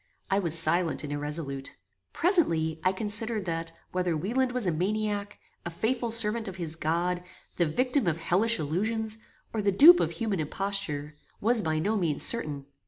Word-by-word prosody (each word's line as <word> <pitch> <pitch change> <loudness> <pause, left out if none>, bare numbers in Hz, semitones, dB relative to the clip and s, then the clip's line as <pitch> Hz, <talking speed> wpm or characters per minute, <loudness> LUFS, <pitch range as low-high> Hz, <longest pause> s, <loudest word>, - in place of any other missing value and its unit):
I 195 - +3
was 165 -4 +2
silent 165 +1 +1
and 145 -1 -5
irresolute. 145 -2 -3 0.3
Presently, 165 - +2
I 185 - +3
considered, 215 +1 0
that 165 -1 -3 0.2
whether 180 -3 -1
Wieland 245 - 0
was 250 -3 -2
a 180 - +1
maniac, 205 +4 -2 0.3
a - - -4
faithful 235 +7 -2
servant 225 0 +2
of 190 - -6
his 165 -4 -3
God, 170 +3 -1 0.4
the 170 - +2
victim 250 - 0
of 165 -2 +1
hellish 200 +8 +2
illusions, 215 +8 -2 0.3
or 220 - -1
the 200 0 +2
dupe 330 - +8
of - - -1
human 215 -6 -2
imposture, 150 -3 -3 0.3
was 230 +2 +1
by 160 -3 -1
no 210 +8 0
means 165 -6 +1
certain. 150 -12 0
190 Hz, 170 wpm, -27 LUFS, 160-220 Hz, 0.4 s, dupe